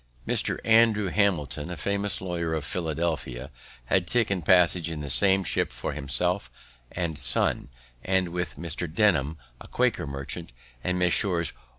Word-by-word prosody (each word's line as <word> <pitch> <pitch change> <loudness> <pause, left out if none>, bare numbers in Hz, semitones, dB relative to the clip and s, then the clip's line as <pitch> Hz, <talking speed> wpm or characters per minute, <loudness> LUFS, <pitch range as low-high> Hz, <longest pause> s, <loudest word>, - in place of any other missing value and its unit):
Mr. - - 0
Andrew 110 -3 +4
Hamilton, 85 -7 0
a 90 - -5
famous 100 0 -1
lawyer 85 -3 -2
of 75 -2 -3
Philadelphia, 80 -6 -3 0.3
had 90 +6 +1
taken 100 -5 +1
passage 90 -1 +4
in 80 -2 -5
the 70 -2 -3
same 95 +4 +5
ship - - 0
for - - -4
himself 80 +5 -1 0.4
and 85 -4 -3
son, - - 0 0.3
and 95 -1 +1
with 90 0 -3
Mr. 85 +1 -4
Denham, 80 -6 +2 0.2
a - - -11
Quaker - - 0
merchant, 70 +3 -6 0.3
and 90 0 0
Messrs. 90 -2 +2
85 Hz, 145 wpm, -26 LUFS, 80-95 Hz, 0.4 s, same